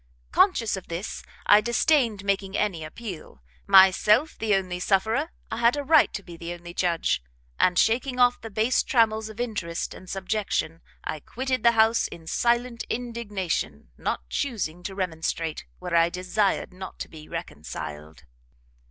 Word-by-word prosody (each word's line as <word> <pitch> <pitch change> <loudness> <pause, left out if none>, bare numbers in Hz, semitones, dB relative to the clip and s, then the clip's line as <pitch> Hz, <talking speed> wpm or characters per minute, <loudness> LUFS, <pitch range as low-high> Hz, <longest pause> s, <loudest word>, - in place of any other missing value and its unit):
Conscious 235 - +3
of 190 - -8
this, 170 +4 -5 0.2
I 205 +1 +7
disdained 235 -2 +2
making 195 0 0
any 190 -6 -1
appeal; 155 - -8 0.2
myself 200 +8 +6
the 215 -2 +1
only 185 -2 -2
sufferer, 220 - +1 0.2
I - - -2
had 235 +4 +3
a 290 - -2
right 310 +1 +5
to 200 - -5
be 175 -2 -10
the 170 +1 -6
only 175 0 -10
judge, 170 - +1 0.4
and, 180 -1 +3
shaking 250 +5 +2
off 245 0 +4
the 225 - -7
base 220 +4 +2
trammels 220 -3 +2
of 220 +1 -11
interest 205 -9 -3
and 185 - -12
subjection, 190 -4 -2 0.2
I 155 - -4
quitted 255 - -3
the 235 0 +5
house 225 0 +4
in 165 - -11
silent 235 +5 0
indignation, 205 - -3
not 65 - -3
chusing 190 - -2
to 195 - -4
remonstrate, 165 -3 -3
where 180 -1 -3
I 165 0 +5
desired 185 +2 0
not 190 +1 -8
to - - -5
be 155 -2 -12
reconciled." 75 - -7
195 Hz, 155 wpm, -26 LUFS, 170-235 Hz, 0.4 s, I